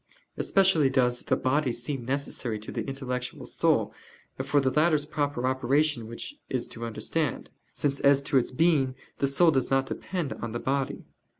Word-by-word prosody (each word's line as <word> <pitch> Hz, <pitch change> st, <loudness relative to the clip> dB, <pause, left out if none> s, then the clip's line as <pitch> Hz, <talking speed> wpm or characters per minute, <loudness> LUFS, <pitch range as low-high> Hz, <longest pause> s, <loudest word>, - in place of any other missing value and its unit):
Especially 185 Hz, -8 st, +3 dB
does 125 Hz, -2 st, +1 dB
the -, -, +2 dB
body 130 Hz, +1 st, +1 dB
seem 120 Hz, +2 st, -4 dB
necessary 130 Hz, -4 st, -2 dB
to 105 Hz, -, -8 dB
the -, -, -3 dB
intellectual 125 Hz, -2 st, -4 dB
soul, -, -, +1 dB, 0.5 s
for 145 Hz, -, +2 dB
the 130 Hz, -1 st, +1 dB
latter's 155 Hz, -1 st, +3 dB
proper 145 Hz, -4 st, -1 dB
operation 130 Hz, 0 st, +1 dB
which 115 Hz, -, -7 dB
is 130 Hz, -3 st, -2 dB
to 115 Hz, 0 st, -7 dB
understand: 115 Hz, +8 st, -2 dB, 0.2 s
since 140 Hz, -1 st, 0 dB
as 140 Hz, 0 st, +4 dB
to 140 Hz, -, +2 dB
its 120 Hz, -, -2 dB
being 135 Hz, -2 st, +2 dB, 0.2 s
the 140 Hz, -, +2 dB
soul 160 Hz, +5 st, +4 dB
does 130 Hz, -4 st, 0 dB
not 135 Hz, 0 st, +2 dB
depend 170 Hz, +2 st, -3 dB
on 115 Hz, -2 st, -6 dB
the 120 Hz, -, -2 dB
body. 135 Hz, +1 st, -2 dB
135 Hz, 170 wpm, -27 LUFS, 125-150 Hz, 0.5 s, as